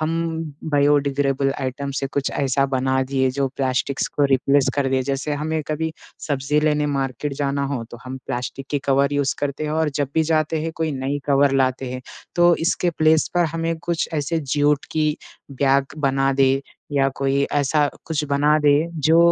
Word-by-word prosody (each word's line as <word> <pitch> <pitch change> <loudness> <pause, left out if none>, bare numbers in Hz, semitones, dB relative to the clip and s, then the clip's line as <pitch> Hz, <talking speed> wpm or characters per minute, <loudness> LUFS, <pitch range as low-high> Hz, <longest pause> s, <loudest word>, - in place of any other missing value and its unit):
हम 155 +1 0 0.6
biodegradable 140 -1 +2
item 140 +1 -3
से 135 - -1
कुछ 140 0 -2
ऐसा 135 0 +1
बना 130 0 +1
दिए 130 0 0
जो 135 -1 +2
प्लास्टिक्स 135 0 0
को 145 - 0
रिप्लेस 140 +1 +2
कर 140 -2 +1
दे। 130 0 +1
जैसे 140 +3 -2
हमें 155 +2 -2
कभी 160 +1 -2 0.4
सब्जी 145 +1 +1
लेने 150 -1 +1
मार्केट 140 0 -2
जाना 140 0 -1
हो, 135 -3 -2
तो 120 - -11
हम 130 +1 -6
प्लास्टिक 125 +2 -4
की 145 - +1
कवर 140 +1 +2
यूज़ 140 -1 +1
करते 145 +1 -2
हैं 150 - -2
और 160 0 +1
जब 140 - 0
भी 160 - +3
जाते 155 0 +1
हैं 165 - -3
कोई 160 -2 -1
नई 135 +2 -2
कवर 140 0 +4
लाते 130 0 -1
हैं, 130 - -6 0.3
तो 175 0 +5
इसके 175 +1 0
प्लेस 155 -1 +3
पर 175 - +3 0.2
हमें 165 - -1
कुछ 170 -2 -1
ऐसे 155 +2 -1
जूट 145 0 +2
की 155 -1 +1 0.4
बैग 135 0 +1
बना 135 -1 +1
दे 135 0 +3 0.3
या 135 -1 +3
कोई 135 0 +1
ऐसा 145 +1 +2 0.2
कुछ 155 -2 -1
बना 145 +2 +3
दे 145 -1 +4 0.4
जो 165 +1 +6
140 Hz, 185 wpm, -22 LUFS, 135-150 Hz, 0.6 s, जो